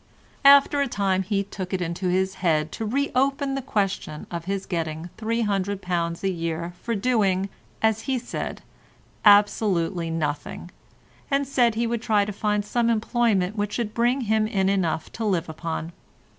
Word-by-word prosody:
After 280 +1 +7
a 280 - +1
time 195 -5 0
he 200 +1 0
took 190 -1 -7
it - - -2
into 175 +1 -2
his 190 +1 +1
head 155 -3 +1
to 220 - -4
reopen 275 +2 0
the 275 - -2
question 195 - -2
of 170 -1 -5
his 195 0 -2
getting 165 -1 -3
£300 195 -6 -1
a 195 - +2
year 170 0 -3
for 235 - -2
doing, 200 -4 +1 0.3
as 220 0 +3
he 265 +1 -1
said, 245 - -5 0.6
absolutely 200 -5 +4
nothing, 160 +2 -3 0.6
and 275 0 +1
said 245 -4 +2
he 235 +1 0
would 235 -1 -1
try 215 -4 +2
to 210 - -5
find 210 0 0
some 235 +2 +1
employment 220 -4 +1
which 205 -1 -2
should 225 -3 -2
bring 245 +3 +2
him 220 -1 +1
in 195 -3 +1
enough 175 -5 0
to 225 - -5
live 185 -5 0
upon. 160 +1 -4
200 Hz, 160 wpm, -24 LUFS, 180-230 Hz, 0.6 s, After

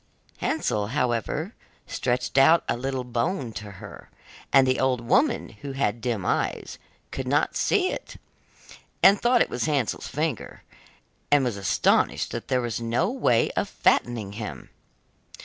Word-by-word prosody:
Hansel, 105 -1 -1
however, 125 - -1 0.3
stretched 125 0 -2
out 160 +5 +6
a - - 0
little 130 +1 -3
bone 125 - -2
to 105 -1 -8
her, 100 +2 -12 0.4
and 135 -1 +6
the 130 0 +1
old 130 -2 +1
woman, 200 - +1
who 140 - -6
had 120 -4 -1
dim 115 -5 -2
eyes, - - -2 0.3
could 130 -1 -5
not 145 +3 +1
see 380 -3 +2
it, - - -7 0.9
and 195 +1 +7
thought 240 0 +4
it - - -8
was 125 - -1
Hansel's 145 -7 -1
finger, 150 -4 -4 0.7
and 145 -1 +4
was 120 -4 -1
astonished 100 -1 +1
that - - -5
there 130 -1 +1
was 120 -1 -3
no 115 - 0
way 125 - +2
of - - -2
fattening 115 -5 +1
him. 105 +1 -7
125 Hz, 150 wpm, -25 LUFS, 115-145 Hz, 0.9 s, and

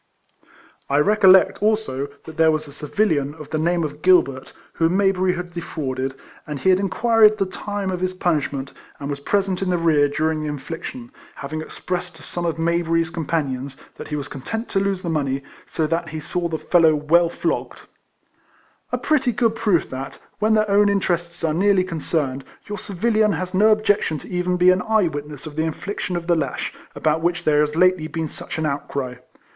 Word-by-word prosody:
I 140 - +2
recollect, 190 +3 +5
also, 210 -11 0 0.2
that 160 - -9
there 160 0 +4
was 155 -1 0
a - - -11
civilian, 150 -2 0
of 155 -2 -11
the 155 - 0
name 170 +1 +1
of 150 0 -5
Gilbert, 140 -8 +3 0.2
whom 165 +3 +1
Mayberry 190 -2 +2
had 175 0 -6
defrauded, 135 -6 -3 0.3
and 150 -1 -4
he 190 - +3
had 185 - +4
in 195 -1 0
quired 225 -1 +4
the 195 - +1
time 200 +1 -4
of 180 - -3
his 185 0 -2
punishment, 145 -6 -1 0.3
and 140 0 -4
was 140 - -4
present 195 +4 0
in 190 - -1
the 180 - +2
rear 155 -4 +3
during 155 +2 0
the 155 - -3
infliction, 165 - -6 0.2
hav 140 +1 -7
ing 155 - -2
expressed 180 +2 -5
to 160 - -14
some 175 0 -4
of 165 - -2
]\layberry's 165 0 +1
compa 165 -2 -1
nions 130 +1 -5 0.2
that - - -8
he 150 - -3
was 145 -1 -4
content 220 - -5
to 195 - +1
lose 195 -1 -1
the - - -4
money, 140 -4 -1 0.2
so 160 - -1
that 165 +1 -1
he 155 0 -5
saw 175 +3 -2
the 160 -1 -2
fellow 160 -2 +4
well 165 +3 +3
flogged: - - -3 0.6
— - - -36
a - - 0
pretty 270 -5 +1
good 230 -1 +1
proof 215 -7 +1
that, 130 +1 -6 0.2
when 215 +1 +3
their 215 0 +2
own 205 0 +4
interests 175 -4 -1
are 160 -2 +1
nearly 190 +2 +3
concerned, 155 -6 -2 0.2
your 205 0 -5
civilian 215 +2 +1
has 180 +3 -4
no 210 +4 +5
objection 205 -6 +2
to - - -11
even 180 0 -1
be 180 +1 +6
an 185 0 +1
e3^e 215 -6 +2
witness 145 0 -7
of 155 -2 -8
the 155 - 0
infliction 180 +3 -3
of 170 -1 -3
the 170 0 +3
lash, 140 -5 -2 0.2
about 155 +1 +1
which 175 +1 0
there 150 -2 +3
has 150 0 +1
lately 180 -2 +3
been 160 0 -3
such - - -7
an 160 - -1
outcry. 140 -3 -3
170 Hz, 205 wpm, -22 LUFS, 150-190 Hz, 0.6 s, be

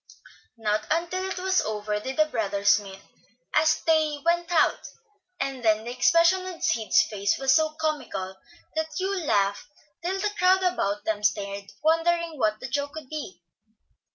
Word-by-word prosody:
Not 215 -1 -1
until 345 +4 -1
it 385 - -4
was 375 +1 +2
over 210 -1 -3
did 265 +6 -6
the 310 - +5
brothers 205 -7 +2
meet, 195 -1 -11 0.5
as 310 +1 +3
they 310 -2 +2
went 345 0 +1
out, 330 - +2 0.5
and 270 -2 -3
then 215 -1 +3
the 240 - -5
expression 335 +6 +4
on 370 -2 -7
Sid's 220 0 +3
face 200 -1 -1
was 270 0 +3
so 315 -1 +2
comical 275 -12 -3 0.4
that 315 0 -1
Hugh 385 +1 -1
laughed 205 - 0 0.4
till 375 +3 -1
the 420 +1 0
crowd 370 +1 +4
about 210 - 0
them 215 -1 -1
stared, 200 -1 -1
wondering 330 0 +1
what 215 -2 +1
the - - -6
joke 285 +2 -2
could 310 -4 -9
be. 190 - -7
290 Hz, 160 wpm, -26 LUFS, 210-335 Hz, 0.5 s, the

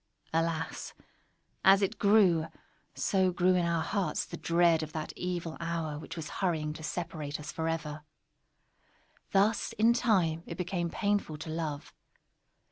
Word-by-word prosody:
Alas! 165 0 -1 0.7
as 195 +1 +7
it 195 - -1
grew, 195 -6 +5 0.5
so 190 -2 +2
grew 180 +1 +3
in 180 -1 +2
our 170 -1 +1
hearts 200 -4 -1
the - - -7
dread 170 0 +3
of 155 -1 -6
that 155 -1 -4
evil 175 -3 -3
hour 165 -3 -3
which 160 - -8
was 160 -2 -5
hurrying 160 -5 0
to 155 - -10
separate 155 -3 -4
us 150 - -6
forever! 160 -2 -3 1.3
Thus, 205 +3 +2
in 225 +3 +4
time, 185 -10 +2
it 170 - -6
became 175 -1 -2
painful 205 -5 -1
to 155 +1 -6
love. 155 -3 -4
170 Hz, 140 wpm, -30 LUFS, 160-185 Hz, 1.3 s, as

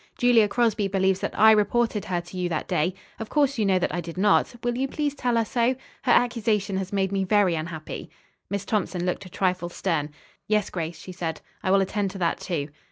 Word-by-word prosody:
Julia 240 -4 +5
Crosby 215 -2 +1
believes 190 -1 +1
that - - -4
I 220 +1 +8
reported 215 0 +2
her 175 -2 -1
to 175 +2 -13
you 180 -1 -1
that 160 -3 -2
day. 180 +1 0 0.2
Of 225 - -5
course 280 -4 +2
you 210 - +2
know 190 -1 +4
that 180 - -1
I 175 - -1
did 170 +1 -8
not. 205 +4 +3
Will 240 0 0
you 265 +2 0
please 290 +1 -2
tell 245 -4 0
her 230 - +2
so? 240 +3 +1 0.3
Her 250 - +1
accusation 220 -5 +2
has 190 -1 -4
made 195 -1 0
me 195 -1 0
very 195 -2 +3
unhappy." 160 -1 -5 0.4
Miss 200 -1 -3
Thompson 190 -4 -1
looked 185 +1 -2
a - - -12
trifle 180 -1 -1
stern. 165 -5 -1 0.4
"Yes, 210 -1 +1
Grace," 165 -2 -4
she 185 - -9
said, 170 -3 -4 0.2
"I - - -1
will 195 +1 +5
attend 195 +1 -1
to 195 - -8
that, 170 -3 0
too." 155 -6 -3
195 Hz, 225 wpm, -25 LUFS, 180-220 Hz, 0.4 s, I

